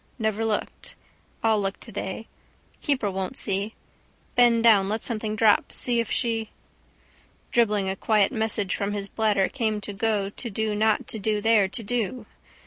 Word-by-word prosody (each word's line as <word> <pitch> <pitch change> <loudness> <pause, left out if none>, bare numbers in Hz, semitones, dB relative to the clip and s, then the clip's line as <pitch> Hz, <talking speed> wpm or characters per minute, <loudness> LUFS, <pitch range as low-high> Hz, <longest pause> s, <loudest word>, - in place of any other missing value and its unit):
Never 220 -2 -1
looked. 220 -2 -3 0.5
I'll 220 -2 +3
look 195 0 -2
today. 215 -1 -6 0.6
Keeper 255 -8 0
won't 190 -1 -3
see. 200 +2 -1 0.6
Bend 235 -2 +4
down 205 -4 +5
let 215 +1 -2
something 215 -2 -3
fall 220 -2 +6
see 240 -2 0
if 230 - -1
she. 225 -3 0 1.0
Dribbling 210 -4 +2
a 190 - -1
quiet 210 0 +2
message 220 -5 0
from 200 0 -2
his 200 -1 -3
bladder 205 -2 +1
came 220 -5 -1
to 205 - -6
go 200 -1 0
to 235 - -4
do 215 +1 -1
not 215 +1 +1
to 220 - -2
do 210 +1 0
there 215 -2 +4
to 230 +4 -5
do. 235 +1 -2
215 Hz, 160 wpm, -25 LUFS, 200-225 Hz, 1.0 s, fall